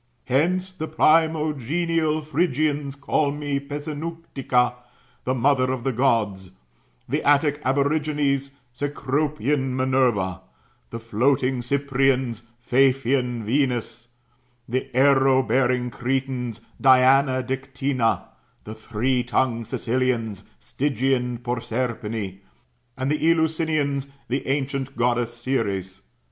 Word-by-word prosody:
Hence 175 +9 +1
the 160 -4 -5
primogenial 155 0 +1
Phyrgians 150 -3 0
call 140 +1 +1
me 145 -1 -2
Pessinuntica, 145 -3 -2 0.5
the 130 - 0
mother 130 0 +2
of 130 -2 -3
the 135 - 0
Gods; 110 -7 +1 0.6
the 145 +5 -1
Attic 145 0 +3
Aborigines, 140 0 0 0.2
Cecropian 145 0 -1
Minerva; 125 -9 +1 0.5
the 115 - -6
floating 125 +3 +1
Cyprians, 130 -3 0 0.2
Paphian 130 -2 +2
Venus; 120 -1 -1 0.6
the 130 +3 -2
arrow 135 -1 +5
bearing 125 0 +1
Cretans, 125 -1 -2 0.2
Diana 130 0 +5
Diqtynna;' 135 -1 -1 0.4
the 110 - -7
three 115 +4 -1
tongued 120 -2 0
Sicilians,^ 120 -4 -1
Stygian 130 -3 -1
Proserpine; 115 -4 -3 0.6
and 130 +2 -1
the 150 - 0
El^usinians, 160 -4 +1 0.2
the 130 +2 -2
ancient 135 -1 -2
Goddess 120 0 0
Ceres. 100 -7 -2
130 Hz, 95 wpm, -23 LUFS, 120-145 Hz, 0.6 s, arrow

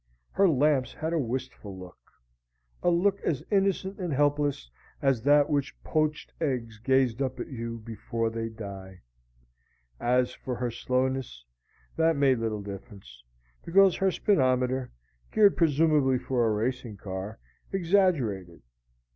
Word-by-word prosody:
Her 195 -1 +4
lamps 140 -3 +2
had 160 +2 -3
a 165 - +1
wistful 125 -6 -5
look 90 -1 -11 0.8
a - - +3
look 190 +3 +2
as 145 -6 -1
innocent 195 -1 +1
and 180 -3 -3
helpless 145 - +1 0.3
as 135 -4 +1
that 145 +3 +5
with 145 - +1
which - - -16
poached 155 -1 -1
eggs 120 -7 -2
gaze 130 0 +2
up 130 -1 -2
at - - -5
you 115 -2 -5
before 115 0 -3
they 115 0 -3
die. 100 -4 -9 1.0
As 125 +1 +1
for 125 - -5
her 120 0 -2
slowness, 125 - -2 0.5
that 165 0 +3
made 135 -3 +3
little 110 -2 -2
difference; 100 - -10 0.4
because 190 +1 +5
her 190 -1 +2
speedometer, 130 -9 +1 0.4
geared 210 -2 +5
presumably 150 -4 +3
for 125 -2 0
a - - +2
racing 115 0 -2
car, 95 +2 -6 0.3
exaggerated. 165 - +1
130 Hz, 135 wpm, -28 LUFS, 115-155 Hz, 1.0 s, that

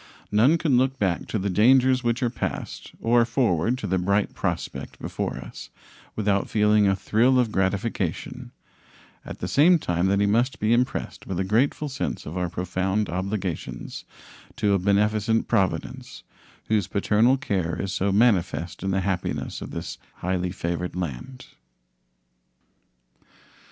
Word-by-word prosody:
None 120 +10 +4
can 150 -6 +2
look 130 +1 +1
back 95 -7 -1
to - - -2
the 100 0 -2
dangers 130 +5 +4
which 120 +1 0
are 120 - +1
passed 120 - -5
or 120 +1 +4
forward 115 - +1
to 120 - -5
the 95 -1 0
bright 100 +3 +1
prospect - - -4
before - - -4
us - - -9 0.5
without 100 -2 0
feeling 105 -1 +3
a 95 - +3
thrill 115 +7 +2
of 120 -4 +2
gratification, 95 -2 -2 0.7
at - - -8
the 90 - -2
same 160 - +5
time 90 - 0
that 100 +1 +2
he 100 - +3
must 120 +6 +1
be 110 +2 +2
impressed 125 +2 -1
with 95 -2 -3
a - - +1
grateful 120 +9 +1
sense 140 - -4
of 80 - -7
our 90 -1 -1
profound 95 +4 -1
obligations 95 -1 -4 0.5
to 100 -1 +1
a 100 - +3
beneficent 105 +3 +1
Providence, 95 -6 -2 0.4
whose 105 -4 +1
paternal 110 +6 +3
care 95 - -2
is 95 -1 -3
so 100 +2 0
manifest 95 -5 +1
in 95 - -2
the 95 0 +1
happiness 95 -1 -3
of - - -6
this - - -6 0.2
highly 90 0 -2
favored 85 -1 -3
land. 90 - -5
100 Hz, 150 wpm, -25 LUFS, 95-120 Hz, 0.7 s, same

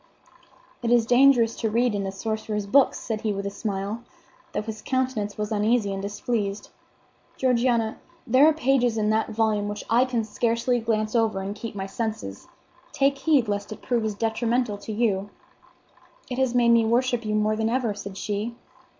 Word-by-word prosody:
"It 235 - -1
is 240 -1 +4
dangerous 245 -2 +5
to 225 - -1
read 235 +1 +2
in 200 -1 -2
a - - -3
sorcerer's 215 +1 -3
books," 270 +7 +3
said 220 -2 -4
he 215 - 0
with 200 0 -3
a 200 - -2
smile, 200 +1 -4 0.5
though - - -2
his 220 0 -6
countenance 255 -6 -1
was 210 0 -3
uneasy 215 -1 +1
and 195 - -4
displeased. 205 0 -3 0.7
"Georgiana, 240 -3 +1 0.3
there 270 +4 +5
are - - +6
pages 260 -6 +1
in 215 0 +1
that 220 +1 +1
volume 215 -2 0
which 205 0 -5
I 240 +3 +5
can 245 -3 -1
scarcely 235 +3 0
glance 220 -1 -1
over 225 -4 +2
and 195 +1 -4
keep 220 +1 -7
my 195 -1 -3
senses. 195 - -5 0.4
Take 275 0 +1
heed 275 -5 +3
lest 205 0 -3
it 215 - -8
prove 240 -3 0
as 215 -1 -2
detrimental 225 0 0
to 210 - -7
you." 205 -3 0 1.0
"It 250 - -2
has 260 -2 +1
made 240 -1 +4
me 235 -1 +5
worship 240 +1 +1
you 215 -1 -1
more 215 0 +2
than 220 +1 0
ever," 240 -3 0
said 200 -1 -8
she. 210 +4 -3
225 Hz, 185 wpm, -25 LUFS, 210-240 Hz, 1.0 s, are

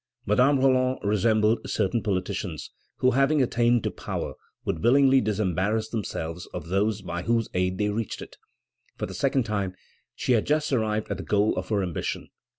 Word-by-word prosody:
Madame 135 +2 +4
Roland 130 -1 +3
resembled 110 +2 +2
certain 115 - 0
politicians, 90 -4 -3 0.3
who, 130 - +3
having 140 +4 +3
attained 120 -2 +2
to - - -1
power, - - -4 0.3
would 80 - -2
willingly 135 +2 +5
disembarrass 105 +1 0
themselves 85 -6 -4
of 85 -2 -6
those 105 +2 0
by 85 -1 -4
whose 115 +3 0
aid 90 0 0
they 105 0 +1
reached 110 +1 -3
it. - - -10 0.6
For - - -2
the - - -8
second 135 - +1
time 100 -4 -2 0.4
she - - -1
had 115 -4 +3
just 150 -1 +1
arrived 110 -3 0
at 100 - -1
the 95 - -6
goal 105 +6 +2
of - - -4
her 105 -3 +1
ambition. 90 -3 -4
110 Hz, 170 wpm, -26 LUFS, 95-125 Hz, 0.6 s, willingly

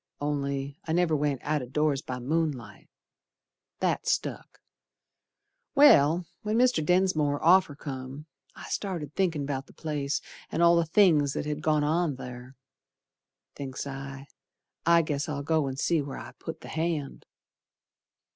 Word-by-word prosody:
Only 140 0 -2
I 160 - 0
never 175 -2 +2
went 145 -3 0
out 150 0 0
o' 125 - -6
doors 145 +1 +1
by 130 -2 -5
moonlight; 130 -5 -3 0.9
That - - 0
stuck. - - -2 1.2
Well, 175 - +6 0.2
when 215 +1 -1
Mr. 250 -8 +3
Densmore's 155 -4 +2
offer 180 -3 +5
come, 135 0 -7 0.3
I - - -11
started 170 -8 -3
thinkin' 165 -7 0
'bout 135 -1 -4
the - - -17
place 150 -2 -2 0.3
An' 170 - +1
all 170 0 +6
the 170 -1 +2
things 160 -6 +4
that - - -3
had 150 0 -3
gone 155 -1 +2
on 160 0 +1
ther. 125 0 -9 1.0
Thinks 135 -1 -5
I, 135 0 -7 0.6
I 170 0 +6
guess 145 -1 -2
I'll 145 -1 -3
go 155 -1 +1
and 135 0 -4
see 165 +2 +1
where 140 -1 -6
I - - -8
put - - -7
the - - -10
hand. 160 -3 -3
150 Hz, 145 wpm, -28 LUFS, 140-165 Hz, 1.2 s, Well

